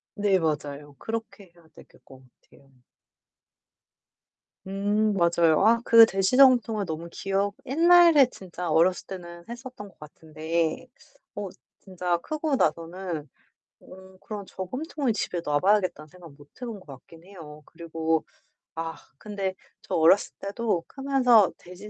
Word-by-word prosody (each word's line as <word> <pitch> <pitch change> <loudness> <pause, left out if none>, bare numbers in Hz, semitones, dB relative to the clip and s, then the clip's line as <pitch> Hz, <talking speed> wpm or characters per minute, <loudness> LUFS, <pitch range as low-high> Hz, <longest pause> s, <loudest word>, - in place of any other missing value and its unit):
네, 200 -2 +2
맞아요. 145 -2 -4
그렇게 225 -4 -7
해야 170 -1 -22
되겠 - - -19
것 130 -1 -16 0.2
같아요. 135 -1 -23 2.0
음 205 +2 0
맞아요. 170 -2 +3
아 230 +1 +4
그 230 -1 +8
돼지 195 +1 0
저금통을 245 -6 +5
너무 165 -1 -6
기억 195 +2 -2
옛날에 330 +1 +6
진짜 180 -6 -8
어렸을 175 +4 +2
때는 175 -2 -9
했었던 240 -3 -9
것 195 - -24
같은데 160 +2 -4 0.5
어 205 -1 -5 0.3
진짜 180 -2 -2
크고 305 - -2
나서는 165 - -2 0.5
어 190 0 -15
그런 205 -2 -8
저금통을 260 - -4
집에 180 -4 -3
놔 145 0 +1
봐야겠다는 185 -6 +1
생각 170 -1 -15
못 145 0 -17 0.2
해 - - -3
본 220 -4 -7
것 - - -20
같긴 145 +4 -14
해요. 160 -6 -12
그리고 165 -1 -2 0.5
아 165 0 -4 0.2
근데 200 -1 -4 0.3
저 - - -8
어렸을 165 +5 +4
때도 200 -3 -2
크면서 260 -6 +3
돼지 180 +4 -12
190 Hz, 270 characters per minute, -26 LUFS, 165-220 Hz, 2.0 s, 그